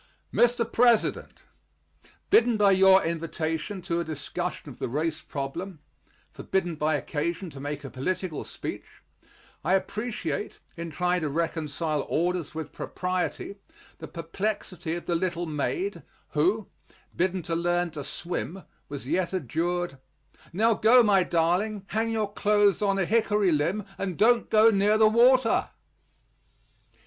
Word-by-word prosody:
MR. 240 Hz, -1 st, +3 dB
PRESIDENT: 235 Hz, -2 st, +2 dB, 0.9 s
Bidden 245 Hz, -, +5 dB
by 205 Hz, -2 st, +5 dB
your 190 Hz, 0 st, +6 dB
invitation 165 Hz, +3 st, -3 dB
to 170 Hz, -2 st, -1 dB
a -, -, 0 dB
discussion 155 Hz, -3 st, -4 dB
of -, -, -10 dB
the -, -, -2 dB
race 155 Hz, +4 st, -2 dB
problem 160 Hz, +6 st, -5 dB, 0.5 s
forbidden 185 Hz, -3 st, -2 dB
by 155 Hz, 0 st, 0 dB
occasion 165 Hz, +5 st, -3 dB
to 135 Hz, -, -10 dB
make 145 Hz, +1 st, -5 dB
a 135 Hz, -, -6 dB
political 170 Hz, +4 st, -3 dB
speech -, -, -8 dB, 0.6 s
I 185 Hz, +4 st, +3 dB
appreciate, 215 Hz, +2 st, -3 dB, 0.2 s
in 170 Hz, 0 st, -5 dB
trying 180 Hz, +2 st, 0 dB
to 155 Hz, -, -1 dB
reconcile 155 Hz, -1 st, -2 dB
orders 175 Hz, -1 st, -1 dB
with 160 Hz, -1 st, -5 dB
propriety, 185 Hz, +2 st, -3 dB, 0.4 s
the 160 Hz, -, -7 dB
perplexity 170 Hz, +1 st, -3 dB
of 175 Hz, -, -6 dB
the 175 Hz, -, -1 dB
little 175 Hz, 0 st, -1 dB
maid, 165 Hz, -, -2 dB, 0.3 s
who, 370 Hz, -, +1 dB, 0.5 s
bidden 185 Hz, 0 st, 0 dB
to 165 Hz, -, -2 dB
learn 175 Hz, 0 st, 0 dB
to 150 Hz, -2 st, -6 dB
swim, 175 Hz, +4 st, -5 dB, 0.3 s
was 140 Hz, -3 st, -6 dB
yet 180 Hz, +6 st, -1 dB
adjured, 175 Hz, -1 st, -2 dB, 0.5 s
"Now, 220 Hz, +6 st, +3 dB
go, 235 Hz, +3 st, +6 dB
my 200 Hz, -3 st, +4 dB
darling; 180 Hz, +5 st, +1 dB
hang 225 Hz, +1 st, 0 dB
your 215 Hz, -2 st, -1 dB
clothes 205 Hz, -3 st, +3 dB
on 200 Hz, -1 st, +2 dB
a 190 Hz, -, +1 dB
hickory 210 Hz, -2 st, +2 dB
limb, 170 Hz, +7 st, 0 dB
and 185 Hz, -4 st, -3 dB
don't 235 Hz, +2 st, +4 dB
go 220 Hz, +1 st, +6 dB
near 205 Hz, +1 st, +3 dB
the 220 Hz, 0 st, +6 dB
water." 240 Hz, +2 st, +4 dB
180 Hz, 135 wpm, -27 LUFS, 160-210 Hz, 0.9 s, your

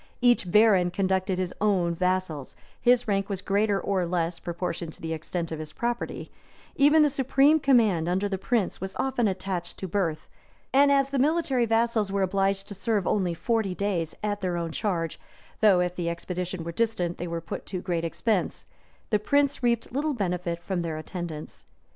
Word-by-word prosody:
Each 240 Hz, -7 st, +3 dB
baron 205 Hz, -4 st, +5 dB
conducted 190 Hz, 0 st, 0 dB
his 185 Hz, -1 st, -2 dB
own 185 Hz, -5 st, +2 dB
vassals: 180 Hz, -5 st, -1 dB, 0.3 s
his 245 Hz, -1 st, +4 dB
rank 195 Hz, -1 st, 0 dB
was 195 Hz, -2 st, -3 dB
greater 200 Hz, 0 st, +1 dB
or 195 Hz, -2 st, 0 dB
less, 170 Hz, -1 st, -1 dB
proportioned 170 Hz, -2 st, -4 dB
to -, -, -14 dB
the 160 Hz, 0 st, -2 dB
extent 165 Hz, +1 st, -4 dB
of 160 Hz, -, -4 dB
his 155 Hz, -1 st, -7 dB
property: 240 Hz, 0 st, -3 dB, 0.4 s
even 295 Hz, +2 st, +6 dB
the -, -, +5 dB
supreme 275 Hz, +3 st, +4 dB
command 220 Hz, -, +3 dB
under 190 Hz, +3 st, +1 dB
the 190 Hz, -2 st, -3 dB
prince 215 Hz, -3 st, -1 dB
was 190 Hz, 0 st, -5 dB
often 260 Hz, -4 st, 0 dB
attached 185 Hz, -2 st, -3 dB
to 190 Hz, -, -5 dB
birth; 165 Hz, -4 st, -1 dB, 0.5 s
and 280 Hz, +1 st, +6 dB
as 275 Hz, -1 st, +3 dB
the 275 Hz, -, 0 dB
military 275 Hz, -4 st, +2 dB
vassals 225 Hz, -2 st, +1 dB
were 200 Hz, 0 st, +1 dB
obliged 195 Hz, +1 st, 0 dB
to -, -, -5 dB
serve 205 Hz, -1 st, -1 dB
only 185 Hz, -5 st, +1 dB
forty 220 Hz, -1 st, 0 dB
days 180 Hz, -6 st, -2 dB
at 205 Hz, -1 st, -1 dB
their 180 Hz, -2 st, -1 dB
own 170 Hz, -1 st, -3 dB
charge, 170 Hz, -4 st, -2 dB, 0.4 s
though, 200 Hz, -4 st, +5 dB
if 180 Hz, 0 st, -1 dB
the 175 Hz, -2 st, -2 dB
expedition 180 Hz, +1 st, -4 dB
were 170 Hz, -, -4 dB
distant, 180 Hz, -4 st, -1 dB
they 175 Hz, -, -3 dB
were 170 Hz, 0 st, -3 dB
put 165 Hz, -, -7 dB
to 185 Hz, -, -3 dB
great 175 Hz, -2 st, -2 dB
expense, 190 Hz, +4 st, -1 dB, 0.5 s
the 210 Hz, -, +3 dB
prince 280 Hz, +6 st, +1 dB
reaped 235 Hz, -2 st, 0 dB
little 290 Hz, +3 st, -1 dB
benefit 180 Hz, -4 st, -2 dB
from 185 Hz, -2 st, -2 dB
their 165 Hz, -2 st, -3 dB
attendance. 160 Hz, -1 st, -7 dB
190 Hz, 185 wpm, -26 LUFS, 175-230 Hz, 0.5 s, even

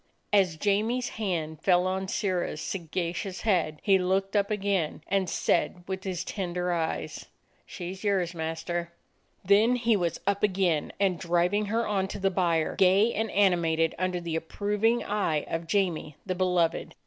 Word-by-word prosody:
As 185 Hz, -6 st, +3 dB
Jamie's 215 Hz, +7 st, +1 dB
hand 165 Hz, -7 st, -3 dB
fell 180 Hz, -1 st, +3 dB
on 190 Hz, +1 st, -1 dB
Sirrah's 185 Hz, -6 st, -1 dB
sagacious 175 Hz, +2 st, -4 dB
head, 175 Hz, -8 st, +1 dB
he 195 Hz, -2 st, +4 dB
looked 195 Hz, +2 st, 0 dB
up 200 Hz, -1 st, +2 dB
again, 195 Hz, -7 st, -1 dB
and 190 Hz, -2 st, 0 dB
said 175 Hz, -, 0 dB
with 190 Hz, 0 st, -4 dB
his 180 Hz, -2 st, -2 dB
tender 180 Hz, -2 st, -2 dB
eyes: 165 Hz, -2 st, -3 dB, 0.4 s
"She 180 Hz, -1 st, -6 dB
's 190 Hz, -, -12 dB
yours, 190 Hz, -4 st, +1 dB
master." 170 Hz, +1 st, -3 dB, 0.5 s
Then 210 Hz, +6 st, +5 dB
he 235 Hz, -2 st, +2 dB
was 175 Hz, -4 st, -1 dB
up 200 Hz, 0 st, +1 dB
again, 185 Hz, -6 st, +1 dB
and 190 Hz, -4 st, +1 dB
driving 175 Hz, +5 st, +1 dB
her 225 Hz, +3 st, 0 dB
on 195 Hz, -2 st, 0 dB
to -, -, -6 dB
the 195 Hz, -1 st, +1 dB
byre, 170 Hz, -4 st, +1 dB
gay 195 Hz, +5 st, +4 dB
and 220 Hz, +1 st, -1 dB
animated 170 Hz, -5 st, +2 dB
under 185 Hz, -1 st, 0 dB
the 170 Hz, -2 st, -4 dB
approv 205 Hz, +6 st, -3 dB
ing 230 Hz, 0 st, +3 dB
eye 195 Hz, -8 st, 0 dB
of 165 Hz, 0 st, -3 dB
Jamie 170 Hz, -6 st, 0 dB
the 185 Hz, -, -1 dB
beloved. 180 Hz, -2 st, 0 dB
185 Hz, 160 wpm, -28 LUFS, 170-200 Hz, 0.5 s, Then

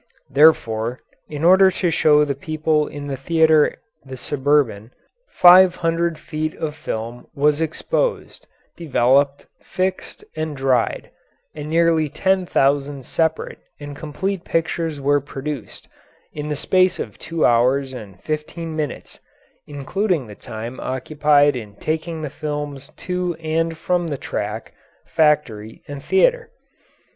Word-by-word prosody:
Therefore, 125 Hz, -5 st, +3 dB, 0.3 s
in 150 Hz, 0 st, -5 dB
order 190 Hz, +2 st, +7 dB
to 180 Hz, -2 st, -1 dB
show 150 Hz, -2 st, +4 dB
the 140 Hz, -, -1 dB
people 155 Hz, +1 st, -1 dB
in 145 Hz, 0 st, -8 dB
the 140 Hz, -1 st, -3 dB
theatre 160 Hz, +2 st, +3 dB, 0.3 s
the 130 Hz, -1 st, -9 dB
Suburban, 135 Hz, -5 st, 0 dB, 0.4 s
five 180 Hz, 0 st, +7 dB
hundred 165 Hz, -1 st, -1 dB
feet 155 Hz, 0 st, -4 dB
of 150 Hz, -2 st, -4 dB
film 115 Hz, -4 st, -6 dB
was 150 Hz, +2 st, +2 dB
exposed, 480 Hz, -, -2 dB, 0.3 s
developed, 140 Hz, -2 st, +2 dB, 0.2 s
fixed, 185 Hz, 0 st, -4 dB
and 155 Hz, -2 st, -4 dB
dried, 130 Hz, -3 st, 0 dB, 0.4 s
and 150 Hz, 0 st, -7 dB
nearly 165 Hz, -1 st, +2 dB
ten 190 Hz, +4 st, 0 dB
thousand 140 Hz, -2 st, +1 dB
separate 160 Hz, +3 st, -1 dB, 0.2 s
and 145 Hz, -1 st, -8 dB
complete 170 Hz, +6 st, -4 dB
pictures 165 Hz, -2 st, -2 dB
were 145 Hz, +1 st, +2 dB
produced, 140 Hz, -2 st, -7 dB, 0.5 s
in 150 Hz, 0 st, -5 dB
the 150 Hz, -, -1 dB
space 185 Hz, +4 st, +2 dB
of -, -, -7 dB
two 165 Hz, -1 st, -1 dB
hours 130 Hz, +3 st, +2 dB
and 100 Hz, -6 st, -10 dB
fifteen 155 Hz, +1 st, -4 dB
minutes, 150 Hz, -4 st, -5 dB, 0.5 s
including 155 Hz, -, -2 dB
the 105 Hz, -, -11 dB
time 115 Hz, +4 st, -8 dB
occupied 145 Hz, +2 st, +2 dB
in 105 Hz, -4 st, -7 dB
taking 160 Hz, +5 st, -3 dB
the 145 Hz, -, -4 dB
films 145 Hz, -2 st, -5 dB
to 180 Hz, -1 st, -3 dB
and 165 Hz, +1 st, -2 dB
from 175 Hz, +1 st, -1 dB
the 145 Hz, -3 st, -3 dB
track, 105 Hz, -2 st, -5 dB, 0.3 s
factory, 135 Hz, -9 st, 0 dB
and 145 Hz, -1 st, -8 dB
theatre. 485 Hz, +4 st, +2 dB
150 Hz, 130 wpm, -21 LUFS, 135-165 Hz, 0.5 s, order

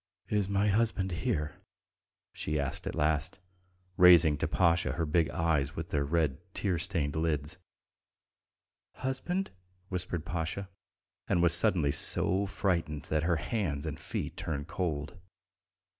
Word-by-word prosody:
"Is 105 Hz, -2 st, +1 dB
my 100 Hz, +1 st, +2 dB
husband 100 Hz, -3 st, +1 dB
here?" 75 Hz, -3 st, -2 dB, 0.8 s
she 75 Hz, 0 st, -2 dB
asked 75 Hz, +6 st, -3 dB
at -, -, -3 dB
last, 75 Hz, -1 st, 0 dB, 0.6 s
raising 85 Hz, -4 st, +8 dB
to -, -, 0 dB
Pasha 85 Hz, -3 st, +2 dB
her 85 Hz, +2 st, -1 dB
big 80 Hz, +1 st, +2 dB
eyes 75 Hz, -4 st, 0 dB
with 80 Hz, +1 st, -5 dB
their 70 Hz, -1 st, 0 dB
red 75 Hz, -1 st, 0 dB, 0.2 s
tear 90 Hz, -5 st, 0 dB
stained 75 Hz, -3 st, -1 dB
lids. 80 Hz, 0 st, 0 dB, 1.4 s
"Husband?" 175 Hz, +9 st, -2 dB, 0.4 s
whispered 90 Hz, -3 st, -3 dB
Pasha, 85 Hz, +4 st, -3 dB, 0.6 s
and 90 Hz, -3 st, +2 dB
was 85 Hz, -1 st, +5 dB
suddenly 85 Hz, -4 st, +4 dB
so 95 Hz, +6 st, +1 dB
frightened 85 Hz, -7 st, -1 dB
that 80 Hz, 0 st, +2 dB
her 85 Hz, +2 st, +2 dB
hands 80 Hz, -4 st, -2 dB
and 80 Hz, 0 st, -4 dB
feet -, -, -4 dB
turned 75 Hz, -1 st, -4 dB
cold. 80 Hz, +1 st, -3 dB
85 Hz, 130 wpm, -30 LUFS, 75-95 Hz, 1.4 s, raising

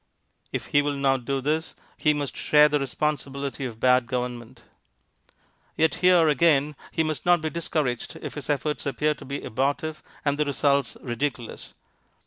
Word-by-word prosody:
If -, -, -3 dB
he 145 Hz, -, +6 dB
will 145 Hz, 0 st, -1 dB
not 135 Hz, -3 st, +1 dB
do 135 Hz, +1 st, -1 dB
this 155 Hz, +4 st, -1 dB, 0.2 s
he 150 Hz, -, +2 dB
must 145 Hz, -2 st, -3 dB
share 150 Hz, 0 st, +5 dB
the 150 Hz, 0 st, +1 dB
responsibility 140 Hz, 0 st, -2 dB
of 115 Hz, -3 st, -7 dB
bad 125 Hz, -1 st, +4 dB
government. 125 Hz, -1 st, -4 dB, 1.1 s
Yet 160 Hz, 0 st, +3 dB
here, 180 Hz, -3 st, +6 dB
again, 150 Hz, -1 st, +3 dB, 0.2 s
he 160 Hz, -, +1 dB
must 155 Hz, -2 st, -3 dB
not 175 Hz, 0 st, +4 dB
be 155 Hz, 0 st, -3 dB
discouraged 150 Hz, -7 st, -2 dB
if -, -, -6 dB
his 145 Hz, -1 st, -7 dB
efforts 150 Hz, +1 st, -1 dB
appear 150 Hz, +2 st, +1 dB
to -, -, -13 dB
be 140 Hz, +1 st, -5 dB
abortive 140 Hz, +6 st, -1 dB, 0.2 s
and 145 Hz, 0 st, +1 dB
the 150 Hz, -, +2 dB
results 140 Hz, -1 st, +1 dB
ridiculous. 120 Hz, -1 st, -4 dB
145 Hz, 160 wpm, -25 LUFS, 130-150 Hz, 1.1 s, he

